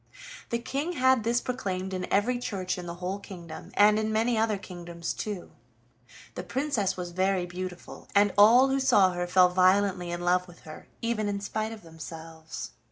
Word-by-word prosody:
The 235 - 0
King 275 +8 -3
had 260 -5 +3
this 235 +2 +1
proclaimed 190 -6 -3
in 185 -1 -4
every 245 +5 +2
church 185 -6 -3
in 175 - -7
the 170 - -5
whole 185 +3 -4
kingdom, 170 -5 -10
and 210 +1 +5
in 220 0 -1
many 225 +2 +1
other 220 -1 +1
kingdoms 175 -3 -6
too. 205 -4 -5 0.8
The - - -5
Princess 235 -1 -1
was 175 -1 -5
very 185 0 +1
beautiful, 180 0 -8
and 205 -1 +4
all 235 +6 +7
who 270 +1 +1
saw 230 -8 +4
her 175 0 -3
fell 180 0 +5
violently 185 0 +3
in 175 0 -4
love 180 +1 +2
with 175 0 -15
her, 155 -2 -11 0.2
even 230 -2 0
in 200 0 -2
spite 215 +2 -3
of 220 -3 -10
themselves. 160 - -9
195 Hz, 180 wpm, -28 LUFS, 180-220 Hz, 0.8 s, all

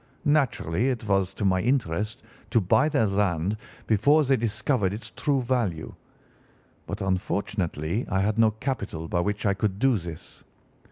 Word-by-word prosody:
Naturally, 130 - +1
it 115 -4 -3
was 95 -1 +2
to 105 - -2
my 95 -1 +3
interest 110 -5 -1 0.3
to 115 +1 +3
buy 110 - +3
their 140 -7 +2
land 100 -2 0 0.3
before 145 +9 +4
they 135 -1 +3
discovered 115 -2 0
its 110 +1 -7
true 140 -3 0
value, 115 -11 -1 0.9
but 100 +1 -5
unfortunately 95 -1 -1
I 95 -1 +1
had 105 +3 0
no 110 -1 +6
capital 110 - -4
by 85 - 0
which 105 +4 -1
I 100 - +3
could 95 0 -1
do 130 -1 +3
this. 85 -2 -9
105 Hz, 155 wpm, -26 LUFS, 95-125 Hz, 0.9 s, no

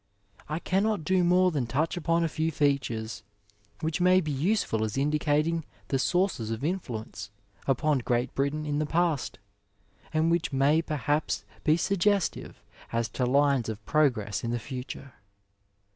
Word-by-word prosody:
I 155 - -1
cannot 195 +1 0
do 185 +3 +2
more 180 +1 +4
than 140 -7 -1
touch 150 +7 0
upon 170 0 +1
a - - +2
few 160 +1 -1
features, 115 -8 -1 0.6
which 160 +2 -1
may 185 +1 +6
be 155 -4 -2
useful 145 - 0
as 110 +3 -2
indicating 150 +3 +1 0.3
the 135 - +1
sources 175 - +1
of 115 +3 -4
influence 125 - -4 0.4
upon 140 +2 +2
Great 120 +1 -1
Britain 140 +3 -1
in 145 0 -1
the 155 - 0
past, 165 -4 0 0.7
and 160 +1 +2
which 170 0 +1
may 140 +4 +3
perhaps 150 -1 -1 0.2
be 155 0 +4
suggestive 200 +1 0 0.3
as 115 0 0
to 125 - -1
lines 140 -3 +3
of 110 -1 -6
progress 125 -10 +1
in 115 - -2
the 120 - 0
future. 130 +2 -7
150 Hz, 150 wpm, -28 LUFS, 125-165 Hz, 0.7 s, may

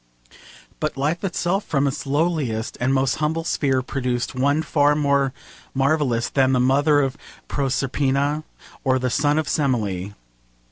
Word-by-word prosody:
But 155 -2 -2
Life 150 +7 -1
itself 190 +1 0
from 140 -2 0
its 140 +1 -3
lowliest 140 -7 0
and 125 +2 +2
most 135 -1 +1
humble 155 +2 -1
sphere 135 -5 0
produced 125 -2 -2
one 140 +4 +1
far 145 -1 +3
more 140 -2 +2 0.4
marvellous 135 -4 +1
than 135 -1 +2
the 130 - +3
mother 145 +4 +3
of 135 +1 -2 0.3
Proserpina 140 +2 0 0.4
or 130 -1 +2
the 125 -1 -1
son 145 +4 +2
of 155 -2 0
Semele. 105 - -1
140 Hz, 140 wpm, -22 LUFS, 130-150 Hz, 0.4 s, far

